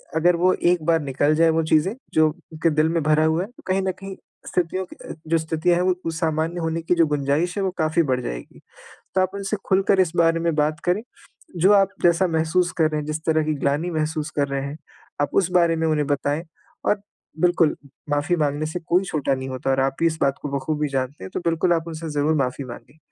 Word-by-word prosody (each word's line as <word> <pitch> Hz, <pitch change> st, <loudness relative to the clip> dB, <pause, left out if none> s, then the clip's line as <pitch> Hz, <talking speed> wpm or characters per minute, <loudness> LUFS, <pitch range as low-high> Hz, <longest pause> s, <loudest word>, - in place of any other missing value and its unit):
अगर 170 Hz, +2 st, +4 dB
वो 185 Hz, +2 st, +3 dB, 0.2 s
एक 175 Hz, -3 st, 0 dB
बार 165 Hz, -1 st, +3 dB
निकल 145 Hz, +2 st, +1 dB
जाए 165 Hz, +1 st, +4 dB
वो 160 Hz, 0 st, +2 dB
चीज़ें, 160 Hz, +7 st, +2 dB, 0.2 s
जो 155 Hz, 0 st, +5 dB
उनके 165 Hz, 0 st, -3 dB
दिल 155 Hz, +1 st, +3 dB
में 165 Hz, 0 st, 0 dB
भरा 155 Hz, +1 st, +3 dB
हुआ 160 Hz, +2 st, +2 dB
है -, -, -7 dB
तो 245 Hz, -, -19 dB
कहीं 190 Hz, +1 st, +1 dB
न 190 Hz, 0 st, 0 dB
कहीं 195 Hz, +1 st, -9 dB, 0.3 s
स्थितियों 185 Hz, +1 st, -1 dB
कि -, -, -14 dB
अ, -, -, -4 dB
जो 165 Hz, +1 st, +3 dB
स्थितियाँ 160 Hz, +2 st, +1 dB
है 180 Hz, -, +1 dB
वो 180 Hz, -2 st, -1 dB
सामान्य 160 Hz, +1 st, -1 dB
होने 165 Hz, 0 st, -1 dB
की 175 Hz, +2 st, +1 dB
जो 165 Hz, -, +6 dB
गुंजाइश 150 Hz, +5 st, 0 dB
है 200 Hz, -, 0 dB
वो 190 Hz, -, 0 dB
काफ़ी 160 Hz, 0 st, +2 dB
बढ़ 125 Hz, 0 st, +1 dB
जाएगी। -, -, -7 dB, 0.6 s
तो 185 Hz, -, +4 dB
आप 185 Hz, -, +1 dB
उनसे 200 Hz, +1 st, -2 dB
खुलकर 195 Hz, 0 st, +3 dB
इस 175 Hz, -3 st, +1 dB
बारे 165 Hz, 0 st, +3 dB
में 170 Hz, 0 st, 0 dB
बात 155 Hz, +1 st, +1 dB
करें, 180 Hz, +4 st, +1 dB, 0.6 s
जो 190 Hz, +5 st, +5 dB
आप 195 Hz, -1 st, +5 dB
जैसा 175 Hz, +2 st, +4 dB
महसूस 165 Hz, +2 st, +1 dB
कर 160 Hz, -2 st, +3 dB
रहे 150 Hz, -, -1 dB
हैं 150 Hz, -, -5 dB
जिस 155 Hz, +1 st, -2 dB
तरह 160 Hz, -1 st, +2 dB
की 155 Hz, -, 0 dB
ग्लानि 145 Hz, +5 st, +1 dB
महसूस 155 Hz, 0 st, -2 dB
कर 140 Hz, -, +2 dB
रहे 140 Hz, 0 st, -2 dB
हैं 140 Hz, +2 st, -6 dB, 0.4 s
आप 145 Hz, -, +1 dB
उस 185 Hz, -2 st, +2 dB
बारे 170 Hz, -2 st, +3 dB
में 160 Hz, 0 st, 0 dB
उन्हें 150 Hz, -2 st, +1 dB
बताएँ 145 Hz, +2 st, -1 dB, 0.4 s
और 205 Hz, -, +1 dB, 0.4 s
बिल्कुल 175 Hz, -2 st, +3 dB, 0.3 s
माफ़ी 145 Hz, +5 st, +1 dB
माँगने 150 Hz, -1 st, 0 dB
से 160 Hz, +3 st, -4 dB
कोई 175 Hz, +2 st, +1 dB
छोटा 145 Hz, -5 st, -1 dB
नहीं 130 Hz, 0 st, -5 dB
होता 130 Hz, +1 st, -3 dB
और 135 Hz, -, +1 dB
आप 135 Hz, 0 st, 0 dB
भी 165 Hz, -, +2 dB
इस 160 Hz, -1 st, -2 dB
बात 135 Hz, 0 st, +2 dB
को 145 Hz, -, -4 dB
बख़ूबी 150 Hz, +2 st, -2 dB
जानते 135 Hz, -3 st, -3 dB
हैं 95 Hz, -, -6 dB
तो -, -, -1 dB
बिल्कुल 170 Hz, +2 st, +2 dB
आप 165 Hz, -1 st, 0 dB
उनसे 160 Hz, 0 st, -6 dB
ज़रूर 150 Hz, +2 st, +1 dB
माफ़ी 135 Hz, -1 st, -1 dB
माँगे। 125 Hz, +3 st, -11 dB
160 Hz, 235 wpm, -23 LUFS, 150-175 Hz, 0.6 s, जो